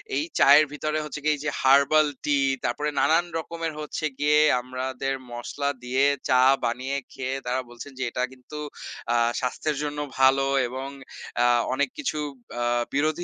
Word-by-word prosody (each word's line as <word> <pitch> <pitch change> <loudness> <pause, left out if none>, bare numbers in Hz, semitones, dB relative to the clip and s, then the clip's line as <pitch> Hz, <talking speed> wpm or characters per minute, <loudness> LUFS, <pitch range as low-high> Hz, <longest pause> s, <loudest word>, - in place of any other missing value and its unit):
এই 300 - +1 0.2
চায়ের 145 +2 +7
ভিতরে 155 +1 -2
হচ্ছে 150 0 -6
গিয়ে 155 0 +3
এই - - -10
যে 155 - 0
হারবাল 140 +3 +5 0.2
টি 145 -1 +2 0.2
তারপরে 145 +5 -1
নানান 165 +2 +3
রকমের 165 0 -4
হচ্ছে 155 +1 -4
গিয়ে 150 +1 +4 0.2
আমরাদের 130 +1 -3 0.2
মসলা 140 +4 -3
দিয়ে 130 +2 +1 0.3
চা 125 -1 +5 0.2
বানিয়ে 130 +4 -2
খেয়ে 135 0 -3
তারা 125 +1 0
বলছেন 120 +4 -10
যে - - -1
এটা 125 - -2
কিন্তু 130 +4 -11 0.6
আ - - +2 0.2
স্বাস্থ্যের 145 +4 -2
জন্য 150 0 -3 0.2
ভালো 135 +1 +5 0.2
এবং 130 +2 -5 0.6
আ - - +4 0.3
অনেক 140 0 +1
কিছু 175 - -2 0.4
আ - - +1 0.3
বিরোধী 155 +4 0
140 Hz, 160 wpm, -25 LUFS, 130-150 Hz, 0.6 s, চায়ের